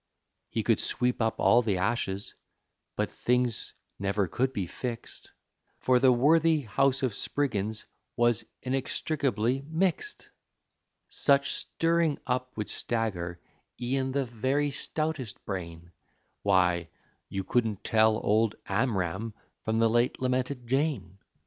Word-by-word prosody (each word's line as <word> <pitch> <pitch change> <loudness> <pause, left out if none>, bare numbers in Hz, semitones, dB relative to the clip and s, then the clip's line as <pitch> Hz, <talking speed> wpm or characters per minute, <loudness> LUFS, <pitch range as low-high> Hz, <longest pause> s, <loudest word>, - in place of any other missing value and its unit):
He - - -1
could - - +3
sweep 125 -1 0
up 110 0 0
all 120 - +5
the 105 -5 0
ashes, 100 0 -1 0.6
but - - 0
things 125 -2 0 0.2
never 100 0 +1
could 130 +10 0
be 100 -7 -2
fixed, 120 +6 -6 0.5
For 130 -1 +3
the 130 0 +6
worthy 155 +5 +4
house 135 +3 +1
of 125 -4 +1
Spriggins 110 -4 -1 0.3
was 120 -2 +3 0.2
inextricably 135 -1 0
mixed! 190 - -1 0.8
Such 140 0 +3
stirring 165 -2 +1
up 125 -1 -2
would 105 - -2
stagger 90 -7 -2 0.4
e'en 130 +2 -1
the 140 0 0
very 130 +5 0
stoutest 155 -5 -3
brain; 85 -3 -6 0.5
Why, 90 -4 +2 0.4
you 95 0 -3
couldn't 110 -2 0
tell 110 0 +4
old 110 0 +2
Amram 100 -1 -1 0.3
from 110 0 -1
the 115 0 +4
late 120 +2 +1
lamented 130 0 -1
Jane. 135 - -1
120 Hz, 120 wpm, -28 LUFS, 105-135 Hz, 0.8 s, the